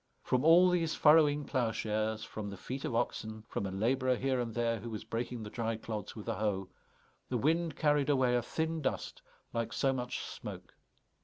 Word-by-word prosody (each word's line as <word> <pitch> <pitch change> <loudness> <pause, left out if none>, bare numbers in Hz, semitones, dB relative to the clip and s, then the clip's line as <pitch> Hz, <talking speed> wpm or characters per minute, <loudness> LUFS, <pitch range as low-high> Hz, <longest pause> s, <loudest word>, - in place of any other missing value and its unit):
From 125 +1 +1
all 175 +3 +7
these 165 -3 +1
furrowing 150 -2 +5
ploughshares, 110 -3 -1
from 105 -2 -6
the 100 - -7
feet 130 +7 -5
of 115 - -2
oxen, 110 -2 -2
from 100 - -3
a - - -5
labourer 125 +6 +1
here 130 +1 0
and 115 -2 -3
there 115 -1 +1
who 115 +3 -6
was 110 -2 -5
breaking 120 0 -4
the 105 - -7
dry 115 -1 -1
clods 110 -2 -5
with 105 - -8
a - - 0
hoe, 95 -2 -1 0.6
the 125 - 0
wind 160 +4 +1
carried 150 -2 +2
away 130 -3 +3
a 120 - +2
thin 160 +6 -2
dust 135 - -3 0.3
like 115 -1 -1
so 135 -1 +1
much 125 -1 -3
smoke. - - -8
120 Hz, 190 wpm, -32 LUFS, 110-145 Hz, 0.6 s, all